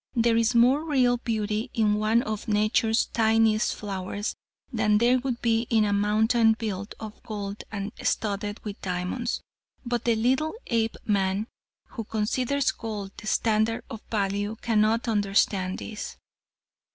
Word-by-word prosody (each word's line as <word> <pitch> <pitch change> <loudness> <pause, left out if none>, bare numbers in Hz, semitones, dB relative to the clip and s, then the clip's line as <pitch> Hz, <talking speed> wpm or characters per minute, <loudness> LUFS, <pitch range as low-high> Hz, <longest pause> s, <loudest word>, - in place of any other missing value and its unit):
There 230 -1 +3
is 230 +1 +2
more 255 +6 +5
real 255 -6 +2
beauty 215 -2 -2
in 215 -2 +3
one 215 +3 +2
of 215 -1 -4
nature's 220 +2 +2
tiniest 225 -1 +2
flowers 200 +1 -4 0.4
than 215 -2 +3
there 245 +3 +4
would 250 -2 -3
be 230 0 +2
in 220 -2 +3
a 205 - +1
mountain 220 +3 +3
built 205 -3 -4
of 220 -1 -9
gold 205 -1 -5
and 200 -1 -4
studded 205 0 -1
with 205 -1 -6
diamonds, 185 +6 -2 0.4
but 240 -1 -2
the 235 -1 +3
little 260 - +1 0.2
Apeman 210 -3 0 0.4
who 225 - -5
considers 245 +6 0
gold 210 -3 -6
the 215 - -9
standard 220 +1 +1
of 225 - -6
value 205 0 -1
cannot 225 +1 +2
understand 200 -3 +1
this." 215 -1 -7
220 Hz, 140 wpm, -26 LUFS, 205-230 Hz, 0.4 s, more